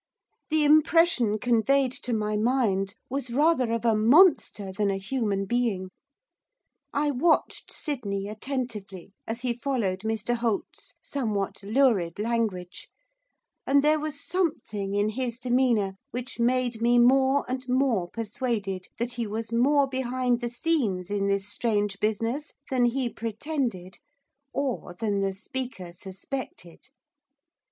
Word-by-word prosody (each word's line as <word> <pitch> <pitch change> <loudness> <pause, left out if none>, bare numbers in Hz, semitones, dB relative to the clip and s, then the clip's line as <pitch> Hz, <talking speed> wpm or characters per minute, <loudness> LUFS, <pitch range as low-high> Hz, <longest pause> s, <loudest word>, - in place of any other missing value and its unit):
The 310 -1 +3
impression 305 -6 +4
conveyed 245 +4 +2
to 255 -1 -5
my 215 -2 0
mind 210 -4 +1
was 270 0 -3
rather 265 -1 +2
of 230 0 -1
a 225 -2 +4
monster 225 - +4
than 200 +1 0
a 195 - 0
human 200 -1 -1
being. 205 -5 -1 1.0
I 290 +1 +1
watched 315 +5 +1
Sydney 200 - -3
attentively 210 -5 -5
as 230 +2 -4
he 245 -1 0
followed 235 -7 -1
Mr 220 +2 -1
Holt's 230 -3 -3
somewhat 215 -9 -2
lurid 205 -6 +2
language, 210 -5 -2 0.8
and 280 +1 +4
there 305 +1 +4
was 300 -1 -4
something 230 - -2
in 205 +1 +2
his 240 0 -3
demeanour 240 -6 +1
which 245 -2 -5
made 245 -1 +1
me 240 +1 +4
more 265 +3 +4
and 255 0 -4
more 250 -9 +1
persuaded 215 -4 -3
that 235 +1 -2
he 235 -2 -3
was 220 +2 -4
more 275 +4 +4
behind 255 -2 0
the 240 - -2
scenes 235 - -1
in 200 -1 0
this 200 0 0
strange 205 -2 -1
business 230 +7 -1 0.2
than 250 -2 +3
he 250 +1 +1
pretended, 230 - -4 0.5
or 260 -10 -3
than 205 -1 -1
the 195 0 +1
speaker 195 -3 -5
suspected. 190 0 -8
235 Hz, 130 wpm, -27 LUFS, 205-260 Hz, 1.0 s, impression